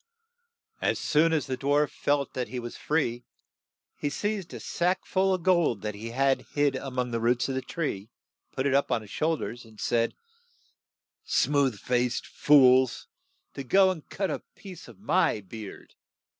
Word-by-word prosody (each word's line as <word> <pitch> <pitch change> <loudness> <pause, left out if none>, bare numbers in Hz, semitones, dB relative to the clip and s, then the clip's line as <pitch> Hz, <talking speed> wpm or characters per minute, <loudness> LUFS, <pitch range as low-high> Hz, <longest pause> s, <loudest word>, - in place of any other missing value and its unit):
As - - +1
soon 155 +2 +2
as 155 -3 +1
the 130 - -2
dwarf 145 +3 +1
felt 145 -1 -1
that 125 -1 -3
he 130 - -6
was 120 -1 -6
free, 120 -6 -1 0.7
he 145 - -2
seized 205 +3 -3
a - - -7
sack 180 +2 -1
full 190 0 +1
of 185 -2 -1
gold 170 - +2
that 105 0 -3
he 110 +3 -7
had 135 +3 +1
hid 145 -2 +2
a 135 +1 -4
mong 125 -1 -2
the 115 - -1
roots 120 +1 +1
of - - -1
the 130 - -1
tree, 115 - -4 0.4
put 130 - -3
it 140 - +2
up 140 +1 +2
on 115 - +1
his 100 - -14
shoul 160 +1 0
ders, 120 -3 -6
and 110 -2 -17
said, 115 -1 0 1.1
"Smooth 140 -7 +1
faced 125 0 0
fools! 130 -3 +4 0.5
to 140 - -6
go 190 +7 +4
and 165 -5 -8
cut 195 -1 -2
a - - -2 0.2
piece 185 -9 -11
ot 115 - -14
my 105 +1 +1
beard. 105 +1 -10
135 Hz, 180 wpm, -27 LUFS, 120-155 Hz, 1.1 s, fools